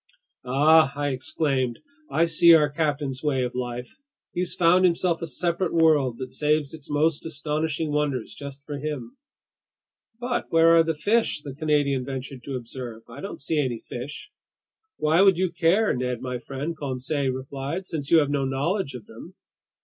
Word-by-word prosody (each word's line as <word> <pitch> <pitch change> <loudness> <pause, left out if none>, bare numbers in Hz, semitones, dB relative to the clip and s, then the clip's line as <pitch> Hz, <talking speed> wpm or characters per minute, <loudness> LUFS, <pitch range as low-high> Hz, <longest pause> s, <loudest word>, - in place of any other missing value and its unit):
"Ah!" 150 +3 +5
I 145 0 -1
exclaimed. 130 -1 -1 0.3
"I 165 - +3
see 165 +1 +6
our 150 -2 +3
captain's 145 -3 -1
way 135 -4 0
of 125 - -3
life! 125 0 -5 0.4
He's 180 0 -2
found 180 +1 +4
himself 175 -1 +2
a 165 - -3
separate 170 +1 -1
world 150 -7 +3
that 130 -1 -6
saves 150 +2 0
its 155 -3 -10
most 150 +1 +1
astonishing 155 0 -2
wonders 145 -5 -1
just 140 -1 -9
for 145 -2 -5
him!" 140 -5 -5 1.0
"But 245 0 -2
where 165 0 +5
are 165 - +7
the 160 -1 -1
fish?" 205 0 +1
the 140 - -7
Canadian 145 -3 +1
ventured 135 0 -6
to 140 - -4
observe. 120 -2 -7
"I 125 +5 -10
don't 200 - -6
see 155 +2 -1
any 125 -5 -1
fish!" 140 - -8 0.7
"Why 160 +4 +3
would 195 -3 +6
you 185 -1 0
care, 175 +6 +2
Ned 125 -1 -2
my 125 0 -4
friend?" 140 +7 -5
Conseil 135 0 -2
replied. 135 +7 -5
"Since 150 -6 -5
you 165 - +6
have 145 - -1
no 140 -1 0
knowledge 135 +4 -1
of 115 -4 -9
them." - - -12
145 Hz, 170 wpm, -25 LUFS, 130-165 Hz, 1.0 s, are